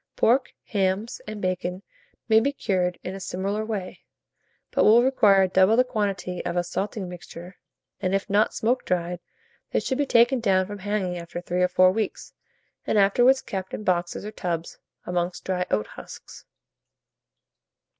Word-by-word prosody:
Pork, 255 +4 +2
hams, 200 +2 -1
and 215 -2 -6
bacon 185 +1 -2 0.4
may 220 -1 +6
be 275 +5 +1
cured 185 -9 -1
in 185 - -5
a 195 - -7
similar 195 +3 -3
way, 210 -4 -5 0.7
but - - +2
will 230 +3 +6
require 205 -7 +4
double 190 +4 +4
the 250 - +5
quantity 200 -7 -3
of - - -3
the 175 - +1
salting 195 +2 -4
mixture; 175 0 -10 0.4
and, 185 +1 +1
if 195 - -2
not 205 +2 +2
smoke 245 +3 0
dried, 175 -1 -2 0.5
they - - +1
should 260 0 -2
be 290 - +1
taken 240 +2 +4
down 190 -4 +2
from 205 +1 -8
hanging 190 -3 -2
after 170 0 -7
3 175 +1 -2
or 180 - +4
4 185 0 +4
weeks, 215 0 -4 0.5
and - - +1
afterwards 245 +7 +4
kept 190 -1 -5
in - - -7
boxes 175 0 -1
or 210 - -5
tubs, 170 -5 -4 0.3
amongst 180 0 -2
dry 180 -1 -1
oat 105 0 +1
husks. - - -12
195 Hz, 165 wpm, -25 LUFS, 180-215 Hz, 0.7 s, may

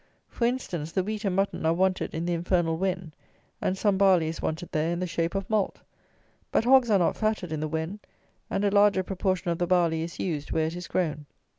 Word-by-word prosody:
For 235 - -1
instance, 180 -11 -2
the 190 - 0
wheat 215 +2 -4
and 190 -2 0
mutton 195 -3 0
are 160 +1 +2
wanted 185 -1 0
in 165 +1 -2
the 175 - 0
infernal 170 -1 +1
Wen, 180 -2 -2 0.5
and 185 - 0
some 200 -1 +1
barley 185 -5 +4
is 165 - -6
wanted 160 +2 -3
there 155 +2 0
in 175 - -2
the 185 - -1
shape 170 0 -2
of 195 0 -2
malt; 215 -3 0 0.7
but - - +2
hogs 255 0 +5
are 205 - +5
not 175 - +2
fatted 215 -6 -1
in 155 - -2
the 155 - -2
Wen, 160 +6 -3 0.5
and 200 - 0
a 200 - +2
larger 200 -2 +4
proportion 185 -1 -1
of 170 - -2
the 175 - 0
barley 170 -3 +2
is 170 +1 -5
used 150 -5 -3
where 160 - +1
it 160 +2 -3
is 180 0 -6
grown. 155 -5 -2
180 Hz, 230 wpm, -27 LUFS, 165-195 Hz, 0.7 s, hogs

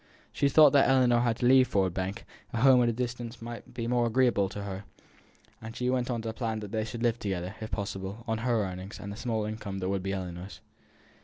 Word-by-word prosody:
She 140 - +1
thought 150 0 +7
that 140 -1 +5
as 135 - +5
Ellinor 120 -2 +4
had 120 -2 +1
to 125 - -1
leave 130 0 +6
Ford 95 -3 +1
Bank, 95 +4 -4 0.3
a 115 - -1
home 130 -1 +7
at 120 - +3
a - - +2
distance 120 0 -4
might 115 0 -8
be 115 -2 -3
more 120 0 +2
agreeable 115 -5 +2
to 100 +1 -6
her, 100 -1 -5 0.8
and 115 0 -8
she 125 0 0
went 125 -1 0
on 120 -2 -2
to 110 -1 -3
plan 115 -2 -2
that 105 -2 -7
they 110 -1 -1
should 115 +1 -6
live 120 -1 +1
together, 95 -2 -3
if 110 - -5
possible, 100 +1 -5
on 110 -1 -1
her 115 -2 +1
earnings, 95 +3 -7
and 100 -1 -6
the - - -6
small 110 -2 -2
income 105 -2 -5
that 95 -1 -2
would 100 -1 -1
be 95 +1 -3
Ellinor's. 90 0 -6
115 Hz, 240 wpm, -29 LUFS, 100-120 Hz, 0.8 s, thought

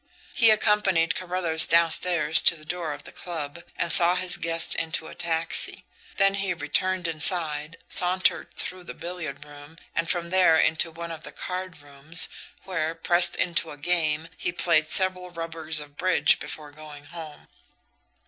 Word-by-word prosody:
He 230 -4 +5
accompanied 210 -6 +3
Carruthers 175 -3 +2
downstairs 165 -1 +3
to - - +4
the 155 -1 -13
door 170 -1 -3
of 145 0 -8
the - - -11
club, 165 -2 -7
and 170 - -1
saw 175 +2 +4
his 180 0 +2
guest 165 0 +1
into 160 -1 -3
a - - -10
taxi; 165 -1 +1 0.3
then 195 -1 +3
he 195 -2 -1
returned 180 +4 -1
inside, 155 -1 0
sauntered 185 +1 +2
through 185 -1 -6
the - - -8
billiard 170 -5 -7
room, 145 +2 -14 0.2
and 165 0 -2
from 170 -1 -1
there 185 -4 +4
into 160 +1 +2
one 170 +1 -8
of 160 -1 -8
the - - -8
cardrooms, 165 -4 -2 0.3
where, 165 -3 -3
pressed 175 +1 +2
into 165 -2 0
a 145 - -9
game, 160 0 0
he - - -2
played 165 -3 +1
several 185 +1 +3
rubbers 165 -2 -4
of 145 -1 -12
bridge 180 -5 +3
before 150 0 -8
going 150 -1 -12
home. 160 -1 -11
165 Hz, 160 wpm, -25 LUFS, 155-180 Hz, 0.3 s, He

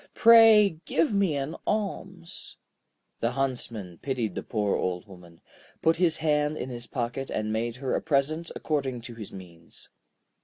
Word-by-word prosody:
Pray 225 -6 +7
give 165 +5 +1
me 195 -6 +2
an 140 +3 -3
alms.' 190 -4 -4 0.6
The 115 +1 0
Huntsman 120 -9 -3
pitied 125 -6 -2
the - - -4
poor 105 -3 -1
Old 90 0 -2
Woman, 90 -3 -15 0.4
put 160 +1 +3
his 175 -2 +2
hand 150 -1 +1
in 130 - -5
his 120 -1 -8
pocket, 125 +2 -4
and 110 0 -2
made 115 +1 -2
her 130 0 -3
a - - 0
present 155 +4 0
according 135 -5 -2
to 120 +1 -9
his 110 -3 -9
means. 85 -3 -13
135 Hz, 155 wpm, -27 LUFS, 110-160 Hz, 0.6 s, Pray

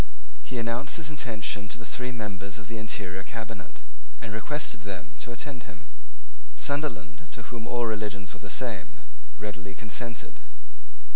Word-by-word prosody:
He 125 - -1
announced 115 +6 +4
his 155 -2 +1
intention 110 -7 +2
to 115 - -1
the 115 - -5
three 125 +2 0
members 100 -3 -1
of 105 - -5
the 115 0 -1
interior 95 -4 +1
cabinet, 110 - -4 0.4
and 105 - -2
requested 120 +1 +1
them 100 -2 -3
to - - -2
attend 120 -2 -2
him. 90 0 -10 0.7
Sunderland, 140 - +1
to 120 - -3
whom 115 -1 -1
all 120 -1 +5
religions 105 -4 +1
were - - -7
the - - -4
same, - - +1 0.4
readily 100 -2 -2
consented. 115 +2 -1
110 Hz, 150 wpm, -33 LUFS, 100-120 Hz, 0.7 s, all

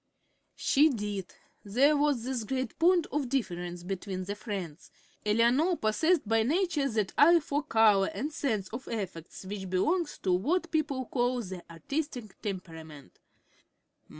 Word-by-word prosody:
She 300 +3 +4
did. 205 - -4 0.3
There 260 +9 +3
was 290 -5 +1
this 255 -2 -2
great 260 +4 -3
point 345 0 +4
of 285 -4 -1
difference 175 -9 -3
between 185 0 -4
the 200 +2 -4
friends. 195 -7 -6 0.3
Eleanor 240 - +3
possessed 295 - +1
by 225 +1 +3
nature 305 - +1
that 215 -4 -1
eye 335 +3 +7
for 290 -1 -2
color 215 -6 +4
and 300 +3 -4
sense 220 -11 -1
of 240 +4 -7
effects 190 -5 -6
which 190 -1 -5
belongs 315 - 0
to 185 - +2
what 330 - 0
people 280 -5 -1
call 245 0 0
the 185 -3 -7
"artistic" 240 - -5
temperament. 160 - -7
225 Hz, 140 wpm, -29 LUFS, 190-290 Hz, 0.3 s, eye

